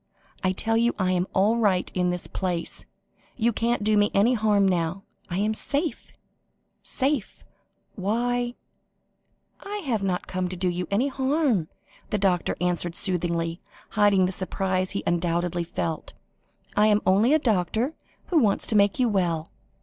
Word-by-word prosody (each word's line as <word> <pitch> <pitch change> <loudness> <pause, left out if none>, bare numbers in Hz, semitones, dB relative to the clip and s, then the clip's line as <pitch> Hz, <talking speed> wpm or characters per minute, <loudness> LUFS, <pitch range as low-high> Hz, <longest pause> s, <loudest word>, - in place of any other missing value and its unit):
I 185 - +3
tell 225 +4 0
you 235 +1 +2
I 185 -2 +1
am 180 0 +1
all 210 +5 +3
right 195 -5 +1
in 180 -1 +1
this 180 -1 -3
place; 180 -3 -3 0.5
you 235 0 +1
can't 230 0 0
do 215 0 +3
me 205 0 +4
any 210 +6 +4
harm 210 -3 +3
now; 180 +1 -1 0.3
I 175 - -2
am 210 +2 +1
safe 290 +8 -1 0.7
safe 270 -5 -2 0.5
why 240 +4 -1 0.5
" - - -45
"I 405 +1 -6
have 230 -6 0
not 185 -2 -1
come 185 -1 -2
to 185 - -5
do 180 0 0
you 175 0 -3
any 235 +8 +1
harm," 265 - +1 0.4
the 210 - 0
doctor 185 -3 +1
answered 175 -1 -1
soothingly, 170 -2 -2 0.3
hiding 205 -3 +4
the 180 - -1
surprise 185 0 -1
he 200 - -3
undoubtedly 175 0 0
felt. 165 -1 -4 0.6
"I 210 +1 +5
am 210 -1 +3
only 210 +10 +4
a - - +6
doctor 225 - 0 0.4
who 340 - +4
wants 210 -7 +2
to 220 - -1
make 200 -1 +4
you 255 - +3
well. 175 -6 0
195 Hz, 160 wpm, -25 LUFS, 180-230 Hz, 0.7 s, a